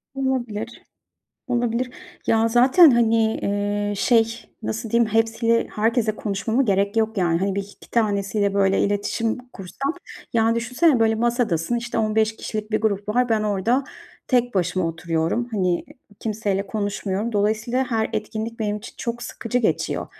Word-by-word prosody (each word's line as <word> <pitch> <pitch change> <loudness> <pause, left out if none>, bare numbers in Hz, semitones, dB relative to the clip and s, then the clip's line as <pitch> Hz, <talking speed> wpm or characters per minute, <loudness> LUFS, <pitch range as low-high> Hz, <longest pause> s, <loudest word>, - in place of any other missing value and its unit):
Olabilir. 240 -4 -3 0.7
Olabilir. 245 0 0 0.4
Ya, 225 0 +3
zaten, 260 +8 +7
hani, 225 -2 +3
eee, 205 0 -1
şey 230 +1 +3 0.3
nasıl 225 +1 -4
diyeyim, 235 -1 +2
hepsiyle 230 +1 +2
herkesle 220 0 +1
konuşmama 220 +5 0
gerek 200 -1 +1
yok 220 0 +1
yani. 170 -2 +2
Hani, 195 +1 -1
1-2 200 0 -7
tanesiyle 200 -2 +1
böyle 195 -1 +3
iletişim 205 +3 0
kursam, 275 - -4 0.4
yani 225 0 +3
düşünsene 250 +4 +2
böyle 225 0 +4
masadasın, 235 -4 0
işte, 235 0 -3
15 220 0 +1
kişilik 215 -1 -5
bir 215 0 +1
grup 205 -2 -1
var, 245 +3 +2
ben 220 -2 +2
orada 215 +6 +1 0.4
tek 245 -2 +2
başıma 180 -1 0
oturuyorum, 165 +7 -1
hani, 185 -4 0 0.4
kimseyle 205 -3 -1
konuşmuyorum. 205 +1 -2
Dolayısıyla 215 +5 +1
her 220 -1 +1
etkinlik 220 +1 -4
benim 210 -2 -1
için 215 +3 -10
çok 235 0 -4
sıkıcı 245 +1 -2
geçiyor. 235 - -1
220 Hz, 140 wpm, -23 LUFS, 205-235 Hz, 0.7 s, zaten